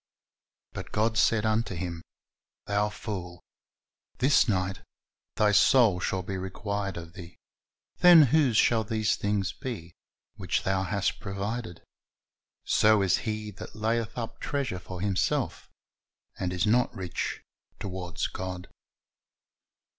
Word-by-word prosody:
But - - -7
God 110 +1 +1
said 110 0 +3
unto 110 -3 0
him, 85 -1 -4 0.6
Thou 105 +1 +1
fool, 90 -5 -6 0.7
this 135 +3 +4
ni<jht 95 -1 -1 0.5
thy 105 -1 +3
soul 105 -2 +5
shall 95 0 -2
be 95 +1 -4
required 100 0 -4
of 85 -1 -8
thee: 85 -2 -11 0.6
then 175 -3 +9
whose 135 -4 +3
shall 115 -1 +4
these 110 0 0
things 100 -2 -1
be, 110 - -7 0.4
which - - -1
thou 95 0 +1
hast 100 +1 -1
provided? 100 -1 -5 0.8
So 105 -1 +4
is 95 -1 +3
he 105 0 -4
that 105 +2 -10
layeth 110 +1 -1
up 115 -1 -5
treasure 135 -11 -2
for 90 0 -8
himself, 100 -2 -1 0.7
and 90 -1 -1
is 90 0 0
not 120 +4 +3
rich 90 -2 -4 0.4
toward 90 -2 -6 0.2
God." 90 0 -5
100 Hz, 125 wpm, -28 LUFS, 95-110 Hz, 0.8 s, then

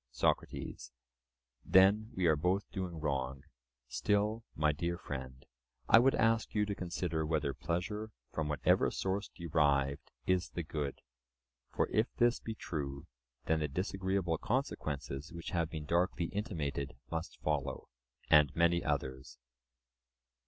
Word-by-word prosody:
SOCRATES: - - -1 0.7
Then 100 +4 +5
we 90 - +1
are 80 -2 +5
both 90 +6 +1
doing 90 -4 -4
wrong. 70 -3 -2 0.4
Still, 105 - +1
my 75 0 +3
dear 85 +4 -2
friend, 65 -5 -7 0.4
I 115 - +8
would 135 +3 +4
ask 115 0 +2
you 105 0 +3
to 100 - -2
consider 85 -3 -2
whether 75 -3 0
pleasure, 100 +8 -2 0.2
from 80 -1 -1
whatever 75 - +3
source 95 +2 -2
derived, 70 -5 +1 0.2
is 90 0 +1
the 85 - -4
good; 75 -3 -4 0.7
for, - - +1
if 110 +3 +1
this 120 0 +3
be 115 - -5
true, 70 -8 -4 0.4
then 80 0 +2
the 75 - 0
disagreeable 95 +1 -1
consequences 75 - -2
which 85 -1 -6
have 85 -2 0
been 80 -2 -5
darkly 85 +2 +1
intimated 75 -9 -3 0.2
must 80 0 -4
follow, 70 -3 -1 0.4
and 75 -1 +6
many 85 +1 +3
others. 65 -3 -2
85 Hz, 130 wpm, -34 LUFS, 70-95 Hz, 0.7 s, I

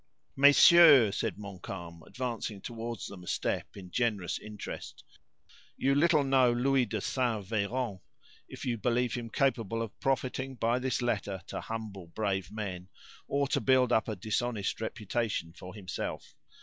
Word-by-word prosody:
"Messieurs," 140 - +7
said - - -2
Montcalm, 95 -4 -8
advancing 120 -5 -4
toward 115 +2 -6
them 95 -3 -10
a - - -13
step, - - -2
in 90 -2 -10
generous 105 -7 -1
interest, 105 -1 -8 0.7
"you 135 - +2
little 155 +1 +4
know 135 -2 +4
Louis 125 +1 +2
de 110 +1 -2
St. 115 -2 -1
Veran 110 +1 -2 0.5
if - - -8
you 120 -3 -1
believe 120 +2 +1
him 120 -2 -4
capable 115 -5 0
of 115 -2 -5
profiting 130 0 -1
by 120 +1 +1
this 130 -1 -1
letter 100 -5 -2
to - - -5
humble 105 -5 -6
brave 95 0 -2
men, 95 -4 -5 0.4
or 140 0 +1
to - - +1
build 130 -2 +3
up 110 - +2
a 110 - -2
dishonest 110 +2 -2
reputation 110 -5 -2
for 90 +3 -10
himself. 95 -3 -5
115 Hz, 150 wpm, -30 LUFS, 100-125 Hz, 0.7 s, Messieurs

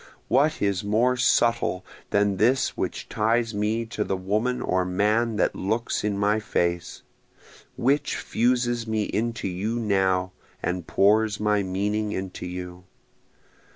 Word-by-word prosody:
What 145 +2 +2
is 100 0 0
more 115 +5 +2
subtle 115 -7 +2 0.2
than 100 -1 +2
this 125 +6 +3
which - - -4
ties 115 +1 +1
me 105 +3 -1
to 110 -2 -3
the 95 - -2
woman 110 +7 -1
or 95 -6 0
man 105 +5 +1
that - - +1
looks 110 +5 -1
in 105 -1 -1
my 105 +2 +2
face? 85 -4 -2 0.7
Which 140 +4 +1
fuses 120 0 0
me 110 -1 0
into 115 +1 -2
you 100 +6 -2
now, 95 -4 +1 0.3
and 90 -1 -2
pours 105 +1 +3
my 105 -1 +2
meaning 105 +3 -1
into 95 -1 -5
you? 90 0 -7
105 Hz, 135 wpm, -25 LUFS, 95-115 Hz, 0.7 s, this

